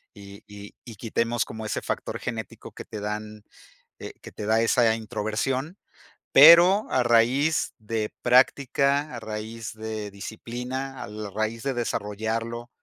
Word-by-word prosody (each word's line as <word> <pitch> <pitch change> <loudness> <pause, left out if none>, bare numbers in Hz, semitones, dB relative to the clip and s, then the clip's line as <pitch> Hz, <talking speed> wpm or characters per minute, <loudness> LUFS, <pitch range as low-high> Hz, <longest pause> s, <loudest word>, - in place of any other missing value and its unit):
y 100 -1 -13
y 100 0 -11
y 115 -3 -10
quitemos 115 +2 -1
como 110 0 -8
ese 105 - -3
factor - - -4
genético 115 -2 -6
que - - -10
te 105 - -7
dan, 105 0 -5 0.6
eh, - - -8
que - - -11
te 105 - -7
da 110 +1 +3
esa 115 -1 +3
introversión, 115 - -3 0.6
pero 170 +8 +8
a 130 - +3
raíz 120 +6 +2
de 110 0 -3
práctica, 140 +3 +3
a 120 - -5
raíz 110 +1 -6
de 110 -1 -5
disciplina, 125 +6 -6
al 105 -1 -7
raíz 110 +1 -2
de 135 -1 -1
desarrollarlo 115 +1 -3
115 Hz, 140 wpm, -25 LUFS, 110-125 Hz, 0.6 s, pero